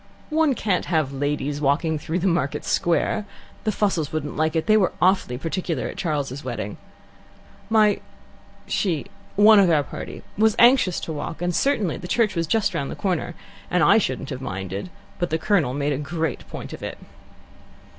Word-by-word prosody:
"One 310 -3 +3
can't 190 -6 0
have 155 -5 0
ladies 145 +1 -2
walking 150 +3 +1
through 160 +3 -2
the 180 - -2
Market 170 -6 0
Square. 175 +5 +1 0.4
The 215 - +2
Fussells 190 -8 0
wouldn't 150 -2 -3
like 155 +1 0
it; 160 - +1
they 215 - +5
were 200 -4 +3
awfully 180 -9 +2
particular 165 -3 -2
at - - -7
Charles's 145 -4 -2
wedding. - - -4 0.9
My 215 -2 +4 0.7
she 170 -8 -1 0.3
one 210 +1 +7
of 190 -3 +5
our 155 -3 +3
party - - -8 0.2
was 220 0 +4
anxious 240 -7 +5
to 160 - -4
walk, 150 +2 -5
and 175 0 -1
certainly 220 - +1
the 180 - -8
church 225 +2 +2
was 165 -1 0
just 205 +1 +1
round 140 -5 -2
the - - -5
corner, 185 -5 -2 0.3
and - - +2
I - - +6
shouldn't - - -3
have - - -5
minded; 95 - -5 0.3
but 175 - 0
the 160 - +1
Colonel 160 -7 +1
made 145 0 0
a 135 - -2
great 160 -1 -3
point - - -7
of - - -8
it." - - -5
165 Hz, 180 wpm, -23 LUFS, 145-200 Hz, 0.9 s, one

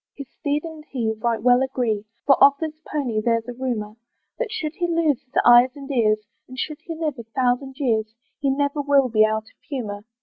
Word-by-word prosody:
His 280 -2 -8
steed 295 0 -2
and 320 -2 -8
he 230 -5 -1
right 230 -1 -1
well 250 0 +5
agree, 240 -6 -1 0.2
For 275 - +6
of 280 0 +8
this 315 -1 -5
pony 250 -8 -1
there's 230 0 +1
a 245 - -5
rumour, 235 -4 -4 0.4
That - - -2
should 325 -9 -3
he 350 +1 -1
lose 330 -5 +1
his 255 - -33
eyes 240 +3 +7
and 280 0 -8
ears, 215 -4 +2 0.2
And 255 - -11
should 305 +3 -4
he 330 - -6
live 310 -5 -3
a - - -6
thousand 260 +1 0
years, 220 -5 0 0.2
He 275 - +1
never 285 +2 0
will 280 -2 +3
be 215 -1 +4
out 220 0 +1
of 220 - -23
humour. 210 -8 -4
260 Hz, 210 wpm, -23 LUFS, 230-290 Hz, 0.4 s, of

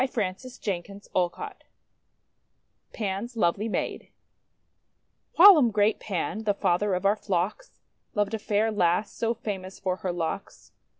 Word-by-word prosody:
142 245 -1 -3 0.4
THE 200 - -15
WONDER 180 -1 +2
GARDEN - - -7 1.3
PAN'S 215 +3 -4
LOVELY 205 +3 +1
MAID - - -3 1.3
WHILOM 335 - +9
great 210 0 +2
Pan, 205 +2 -3
the 205 -1 +2
father 190 +1 +1
of 185 - -3
our 200 +2 +4
flocks, 200 - -3 0.4
loved 205 0 0
a 220 - -1
fair 210 +2 +1
lass 180 0 +1
so 230 0 -1
famous 195 -4 -6
for 185 -1 -1
her 185 -1 -3
locks. 175 +3 -5
205 Hz, 130 wpm, -27 LUFS, 185-220 Hz, 1.3 s, WHILOM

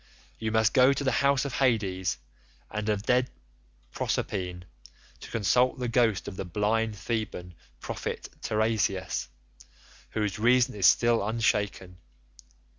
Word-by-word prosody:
You 110 -1 -2
must 110 -1 +3
go 130 +1 +6
to 140 - -3
the 135 - +1
house 140 -1 +3
of 140 - -4
Hades 95 - 0 0.5
and 105 0 -3
of 105 -1 0
dread 125 +1 +2 0.6
Proserpine 90 +3 -3 0.6
to - - -10
consult 125 +4 +2
the 125 -1 -2
ghost 115 -4 +1
of 95 - -7
the - - -3
blind 105 +5 0
Theban 95 -4 -4 0.3
prophet - - -5
Teiresias, 105 -4 -1 0.8
whose 105 -2 -2
reason 120 +2 +4
is 100 -3 +3
still 120 -2 +4
unshaken. 105 -4 -1
110 Hz, 125 wpm, -28 LUFS, 95-120 Hz, 0.8 s, go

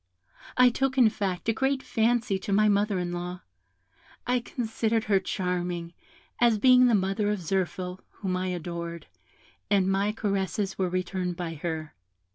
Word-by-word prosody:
I 250 0 +7
took, 270 +2 -1
in 240 -4 +7
fact, 195 -3 -3
a 225 - +3
great 265 +3 0
fancy 230 -3 +1
to 190 - -5
my 215 +2 +4
mother 205 -1 +2
in 175 -1 -2
law; 175 +1 -5 0.8
I 250 0 +2
considered 225 -2 -1
her 200 -2 +3
charming, 180 -2 -3 0.5
as 235 -2 +4
being 250 +2 +6
the 235 - +4
mother 195 +2 0
of 210 - 0
Zirphil, 185 0 -2
whom 190 -3 -4
I 185 0 -1
adored, 170 -1 -5 0.6
and 195 -2 +3
my 195 +2 +1
caresses 200 -2 -2
were 185 -2 0
returned 180 0 -2
by 170 -2 -4
her. 160 -1 -4
195 Hz, 155 wpm, -27 LUFS, 180-220 Hz, 0.8 s, I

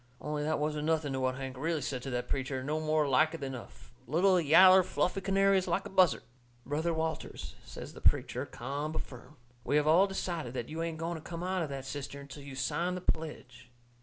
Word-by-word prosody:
Only 150 0 -3
that 155 +1 0
wasn't 150 0 -1
nothing 155 -3 +1
to 130 - -1
what 130 0 0
Hank 135 -1 -6
really 155 +2 -1
said 130 -1 -3
to 135 - -5
that 125 -1 -2
preacher; 130 -1 -2
no 150 +3 -1
more 155 -1 +1
like 155 +4 +3
it - - -7
than 135 -1 -4
a 125 - -7 0.4
little 180 +6 +4
yaller, 185 +5 +8
fluffy 185 +1 -1
canary 195 0 +3
is 185 - -5
like 195 - 0
a - - -7
buzzard. 185 -2 +4 0.4
"Brother 155 +4 0
Walters," 160 0 -3
says - - -9
the - - -11
preacher, - - +2
ca'am 145 +5 -4
but - - -2
firm, 125 +3 -13 0.3
"we 145 - 0
have 150 0 +4
all 170 +6 +5
decided 170 -9 -3
that 120 -2 -4
you 160 +2 -4
ain't 165 -1 -3
going 165 +1 -3
to - - -9
come 170 +2 -6
out 185 0 -1
of 160 - -2
that 135 -1 -5
cistern 140 0 -6
till 140 +1 -10
you 140 -1 -9
sign 170 +7 -1
the 180 - -5
pledge." 130 -8 -4
155 Hz, 225 wpm, -31 LUFS, 135-170 Hz, 0.4 s, yaller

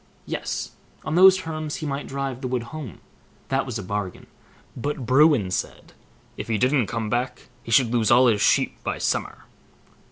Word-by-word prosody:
Yes! - - -4 0.3
on 155 - -2
those 190 +2 +7
terms 155 -4 -4
he 155 - -5
might 140 -1 -3
drive 135 -2 -4
the 130 - -3
wood 125 -2 -2
home, 145 - -8 0.5
that 135 0 0
was 125 - -3
a 105 - -6
bargain; 100 0 -4 0.5
but 140 +1 -4
Bruin 130 - +4
said, - - -4 0.4
"if - - -5
he 110 -2 0
didn't 130 -1 +2
come 115 -2 -3
back, 120 +4 -3
he - - -12
should 115 0 +4
lose 115 -3 +2
all 125 +2 +6
his 110 -4 +3
sheep - - +2
by - - -2
summer". - - -2
130 Hz, 180 wpm, -24 LUFS, 115-145 Hz, 0.5 s, those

